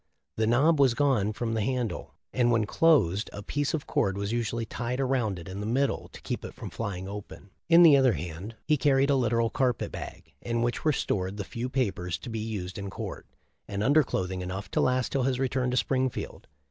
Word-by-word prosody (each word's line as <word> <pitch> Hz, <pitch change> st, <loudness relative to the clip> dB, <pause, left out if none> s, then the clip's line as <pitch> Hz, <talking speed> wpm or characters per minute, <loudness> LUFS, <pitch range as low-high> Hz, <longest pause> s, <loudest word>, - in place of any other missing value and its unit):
The 110 Hz, 0 st, +1 dB
knob 140 Hz, +7 st, +4 dB
was 130 Hz, -4 st, +5 dB
gone 130 Hz, -8 st, +2 dB
from 115 Hz, +1 st, -3 dB
the 110 Hz, -, 0 dB
handle, 125 Hz, 0 st, -2 dB, 0.2 s
and 120 Hz, -2 st, +3 dB
when 115 Hz, -2 st, +2 dB
closed 115 Hz, -, +3 dB
a 100 Hz, -, -8 dB
piece 145 Hz, +7 st, -1 dB
of 150 Hz, -, -4 dB
cord 95 Hz, 0 st, 0 dB
was 100 Hz, +1 st, -2 dB
usually 115 Hz, 0 st, -1 dB
tied 120 Hz, +3 st, -3 dB
around 125 Hz, -7 st, 0 dB
it 85 Hz, -, -9 dB
in 95 Hz, +1 st, -6 dB
the 105 Hz, -, -3 dB
middle 135 Hz, +4 st, 0 dB
to -, -, -12 dB
keep -, -, -4 dB
it -, -, -8 dB
from -, -, -7 dB
flying 95 Hz, -4 st, -4 dB
open. 100 Hz, -1 st, -9 dB, 0.2 s
In 170 Hz, +1 st, +8 dB
the 155 Hz, -4 st, +9 dB
other 130 Hz, -3 st, +4 dB
hand 90 Hz, +8 st, -6 dB
he 150 Hz, -, +3 dB
carried 140 Hz, 0 st, +3 dB
a -, -, +4 dB
literal 115 Hz, -2 st, +1 dB
carpet 125 Hz, -3 st, 0 dB
bag, -, -, -8 dB
in 115 Hz, 0 st, -1 dB
which 120 Hz, 0 st, -1 dB
were 155 Hz, -, +4 dB
stored 95 Hz, -7 st, -1 dB
the 100 Hz, -, -3 dB
few 120 Hz, +5 st, -5 dB
papers 95 Hz, -, -1 dB
to 115 Hz, -, -8 dB
be 110 Hz, -, -3 dB
used 100 Hz, -4 st, -4 dB
in 100 Hz, 0 st, -5 dB
court, -, -, -7 dB, 0.4 s
and 100 Hz, 0 st, -2 dB
undercloth 130 Hz, -9 st, +2 dB
ing 95 Hz, -1 st, -4 dB
enough 95 Hz, +2 st, -5 dB
to -, -, +1 dB
last 125 Hz, -1 st, +1 dB
till 135 Hz, -, +1 dB
his 130 Hz, 0 st, +1 dB
return 130 Hz, -1 st, 0 dB
to 125 Hz, -, 0 dB
Springfield. 130 Hz, -1 st, -1 dB
115 Hz, 220 wpm, -28 LUFS, 100-130 Hz, 0.4 s, the